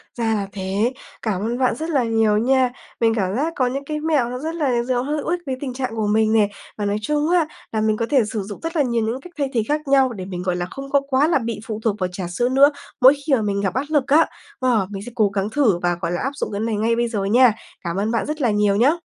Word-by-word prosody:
ra 225 -2 0
là 200 -2 -1
thế! 195 +5 -1 0.3
Cảm 205 -5 -1
ơn 235 +3 -2
bạn 255 - +2
rất 320 +2 -4
là 280 -6 +2
nhiều 225 -2 +2
nha. 255 +2 +3 0.3
Mình 225 -1 +4
cảm 195 -2 -1
giác 315 +5 -1
có 255 - +1
những 275 +3 -3
cái 300 0 -3
mẹo 300 -6 +1
nó 250 +1 -5
rất 320 +4 -4
là 255 -7 +1
giờ 245 0 0
hữu 295 +3 -3
ích 350 +1 0
với 260 -1 -3
tình 260 -3 -4
trạng 255 -3 -3
của 215 -2 -1
mình 220 +1 +2
nè. 210 -2 +4 0.3
Và 205 - -2
nói 205 +1 0
chung 300 +6 0
á, 350 -3 +3 0.3
là 220 - 0
mình 215 0 +1
có 230 - 0
thể 270 -5 +4
sử 215 0 -3
dụng 205 0 -8
rất 330 +1 -4
là 310 - +3
nhiều 235 -3 0
những 240 +4 -3
cách 355 -1 -13
thay 280 -2 0
thế 230 -3 +1
khác 300 0 -1
nhau, 270 -2 +4
để 190 -4 -6
mình, 180 -2 -5
gọi 180 -1 0
là, 175 0 -2
không 275 0 -7
có 280 0 +3
quá 270 +3 +3
là 330 - +3
bị 230 -3 -4
phụ 215 -1 -4
thuộc 215 -3 +1
vào 185 - 0
trà 180 -1 -5
sữa 240 +8 0
nữa 280 +3 +6 0.3
mỗi 260 +2 +9
khi 300 - +1
mà 245 - +3
mình 200 -1 -1
gặp 195 -2 -1
áp 270 +3 -1
lực 295 -3 +2
á. 310 +4 +5 0.4
Wow, 230 -7 +2
mình 195 -1 -5
sẽ 245 - -8
cố 215 -3 +3
gắng 195 +1 -2
thử 230 -9 +2
và, 175 0 0
gọi 170 -1 -1
là, 175 - -2
áp 270 - -1
dụng 220 - -3
cái 200 - -3
này 225 -1 -1
ngay 225 +2 +1
bây 235 0 +1
giờ 210 -4 -2
nha. 240 +3 +5 0.3
Cảm 170 0 -3
ơn 210 +3 0
bạn 230 - 0
rất 305 0 -4
là 240 -4 +3
nhiều 205 -1 +2
nhá. 280 +11 +3
235 Hz, 300 wpm, -21 LUFS, 210-275 Hz, 0.4 s, mỗi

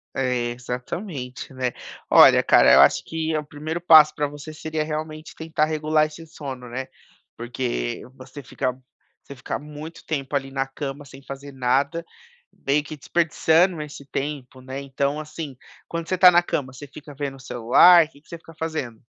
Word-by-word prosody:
É, 125 -2 0
exatamente, 125 - -6
né? 130 -2 -2 0.4
Olha, - - +8
cara, - - +6
eu - - +8
acho - - +5
que 160 -1 -2
o 150 - -3
primeiro 155 +3 -5
passo 155 -3 +7
pra 150 - 0
você 145 +2 -9
seria, 155 0 -3
realmente, 155 0 -5
tentar 160 -1 0
regular 155 0 +1
esse 160 +2 -11
sono, 135 -5 -8
né? 130 +2 -5 0.5
Porque 120 - -3
você 135 +2 -11
fica 130 0 -2 0.5
você 140 - -11
fica 120 - -4
muito 150 +3 -10
tempo, 140 -3 -3
ali, 135 -1 -1
na 135 0 -2
cama 140 +1 -6
sem 135 -1 -14
fazer 140 +1 -9
nada. 135 +5 0 0.6
Meio 145 +2 +3
que 155 +1 -9
desperdiçando 165 +2 +2
esse 145 -2 -10
tempo, 135 -2 -5
né? 130 +1 -6
Então, 140 +2 -2
assim, 155 -2 -7 0.3
quando 170 -1 -5
você 185 - 0
tá 180 0 +8
na 175 0 +4
cama, 135 -6 -3
você 130 +3 -10
fica 145 +1 -12
vendo 140 -1 -4
o - - -16
celular? 130 +8 +6
Que 145 -2 -21
que - - -29
você 170 - -8
fica 165 0 -16
fazendo? 155 -8 -4
145 Hz, 175 wpm, -23 LUFS, 130-155 Hz, 0.6 s, Olha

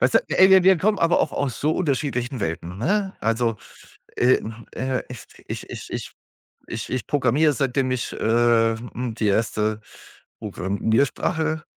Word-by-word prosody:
Weißt - - +2
du, - - +8
ey, 190 +1 +5
wir 190 -1 +7
wir 190 -1 +6
kommen 210 +2 +1
aber 165 +1 +3
auch - - 0
aus 135 -5 -3
so 150 - +2
unterschiedlichen 135 - -1
Welten, 85 +2 -4
ne? 195 - 0
Also, 115 0 0 0.6
äh, 125 +1 +4
hm, 115 +1 -9
äh, 130 0 -2
ich 125 -3 -9 0.2
ich - - -6
ich - - -8
ich - - -5 0.6
ich - - -5
ich 125 -5 -3
programmiere, 145 +2 +2
seitdem 135 -1 0
ich, 130 -1 -2
äh, 115 0 +3
hm, 120 0 -6
die 110 - 0
erste 110 +1 0 0.6
Programmiersprache, 140 - -1
125 Hz, 160 wpm, -23 LUFS, 115-150 Hz, 0.6 s, du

